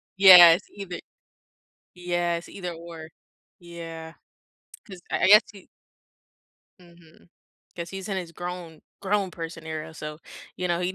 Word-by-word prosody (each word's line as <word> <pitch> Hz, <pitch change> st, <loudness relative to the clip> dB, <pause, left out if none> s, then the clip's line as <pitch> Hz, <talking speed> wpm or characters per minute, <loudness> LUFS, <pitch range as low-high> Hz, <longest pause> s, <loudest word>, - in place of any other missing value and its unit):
Yes, 180 Hz, -2 st, +9 dB
either 195 Hz, -3 st, -8 dB, 1.0 s
yes, 175 Hz, -1 st, -3 dB
either, 180 Hz, -3 st, -7 dB
or. 165 Hz, -1 st, -11 dB, 0.5 s
Yeah. 165 Hz, -1 st, -10 dB, 0.7 s
'Cause 190 Hz, -4 st, -12 dB
I -, -, -1 dB
I -, -, +5 dB
guess 210 Hz, +1 st, +8 dB
he 195 Hz, -, -16 dB, 1.1 s
Mhm. 170 Hz, -1 st, -21 dB, 0.5 s
'Cause 170 Hz, -1 st, -6 dB
he's 195 Hz, +1 st, -7 dB
in 195 Hz, -, -3 dB
his 175 Hz, -3 st, -6 dB
grown 175 Hz, -2 st, -8 dB, 0.2 s
grown 195 Hz, -1 st, -1 dB
person 165 Hz, -1 st, -8 dB
era, 160 Hz, 0 st, -6 dB
so, 150 Hz, -1 st, -8 dB, 0.4 s
you 180 Hz, -, -3 dB
know, 175 Hz, 0 st, -1 dB
he 180 Hz, +1 st, -2 dB
175 Hz, 130 wpm, -25 LUFS, 165-185 Hz, 1.1 s, Yes